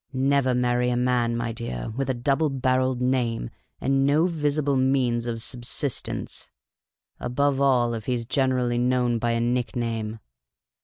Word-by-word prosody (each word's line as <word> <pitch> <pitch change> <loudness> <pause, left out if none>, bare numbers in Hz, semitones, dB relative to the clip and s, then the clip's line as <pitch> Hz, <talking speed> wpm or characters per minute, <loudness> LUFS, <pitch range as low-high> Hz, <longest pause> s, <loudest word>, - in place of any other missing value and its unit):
Never 135 -1 +2
marry 125 0 +1
a 120 - 0
man, 120 -1 +1
my 115 0 -2
dear, 110 - -5
with 135 0 -2
a 130 - +1
double 140 +5 +1
barrelled 130 -1 0
name 125 - 0 0.3
and 135 0 +1
no 145 +4 +3
visible 150 -4 0
means 130 -3 +1
of 115 -1 -2
subsistence; 125 +2 -2 0.7
above 140 +2 0
all, 125 -4 +3
if 110 -2 -6
he 125 -1 +1
's 115 - -5
generally 125 -2 +1
known 125 -1 +1
by 120 +1 0
a 115 - 0
nickname. 115 -2 -2
125 Hz, 150 wpm, -25 LUFS, 120-135 Hz, 0.7 s, no